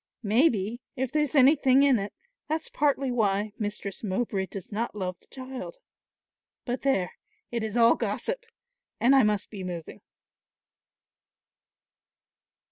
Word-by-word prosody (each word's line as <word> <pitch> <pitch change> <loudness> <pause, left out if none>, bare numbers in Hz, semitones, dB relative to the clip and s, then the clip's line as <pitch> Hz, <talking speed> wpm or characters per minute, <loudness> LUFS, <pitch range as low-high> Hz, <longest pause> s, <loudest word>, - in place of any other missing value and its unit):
Maybe, 225 0 +2
if 260 -2 -2
there's 300 -1 0
anything 275 -1 +6
in 270 -5 +4
it, 200 +1 -4 0.4
that's 315 +1 -2
partly 280 -3 +1
why 210 -3 +1
Mistress 205 -2 -4
Mowbray 195 -1 -1
does 195 +1 -8
not 220 +2 -2
love 185 -3 -4
the - - -21
child. 260 - -7 0.9
But 245 0 -2
there, 230 -10 +1 0.4
it 235 -1 -1
is 220 +1 -3
all 230 0 +7
gossip, - - -3 0.5
and 260 +4 +5
I 270 - +7
must 210 -3 0
be 200 -3 -6
moving." 175 -3 -6
235 Hz, 125 wpm, -27 LUFS, 200-270 Hz, 0.9 s, all